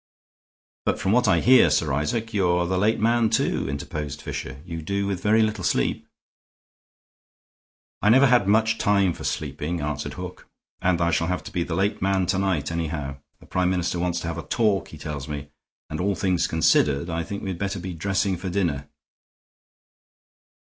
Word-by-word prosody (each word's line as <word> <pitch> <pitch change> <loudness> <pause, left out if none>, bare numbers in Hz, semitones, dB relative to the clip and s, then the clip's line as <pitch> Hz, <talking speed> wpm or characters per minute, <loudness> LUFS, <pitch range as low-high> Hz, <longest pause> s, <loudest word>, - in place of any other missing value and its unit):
"But - - 0
from 95 - 0
what 125 +1 +3
I 85 -4 +4
hear, 125 -9 +6
Sir 75 -1 +1
Isaac, 110 - -1
you 95 -4 +2
are 85 0 +2
the 95 +2 -1
late 110 +3 +2
man, 115 +1 +3
too," 110 -10 0
interposed 75 +1 -5
Fisher. 65 -2 -6
"You 85 -2 -6
must 80 -1 -8
do 100 0 0
with 95 -2 -2
very 110 +2 +4
little 110 0 -2
sleep." - - 0 1.9
"I 105 - +3
never 130 +5 +7
had 125 -6 +4
much 110 +2 +3
time 100 -3 +3
for - - -10
sleeping," 75 +3 -3
answered 75 0 -3
Hook, 90 0 -8 0.3
"and 90 -1 +2
I 85 0 +2
shall 85 0 +1
have 90 0 -2
to - - -9
be 85 - -1
the 85 - -3
late 100 +3 0
man 95 -1 +2
to 95 +2 0
night, 95 -6 0
anyhow. 75 -4 -3 0.2
The - - -17
Prime 90 0 0
Minister 90 -1 -1
wants 90 0 0
to 85 - -4
have 85 0 -3
a - - -9
talk, 105 -5 +1
he 80 - -11
tells 75 -2 -6
me, 75 -1 -6 0.4
and, - - -5
all 100 +1 +1
things 90 -3 +1
considered, 75 -2 +2
I 85 -1 -2
think 100 +4 -6
we'd 95 -3 -4
better 100 0 -2
be 90 +1 -5
dressing 95 +2 0
for 95 +2 -5
dinner." 80 -7 -1
90 Hz, 190 wpm, -24 LUFS, 80-100 Hz, 1.9 s, never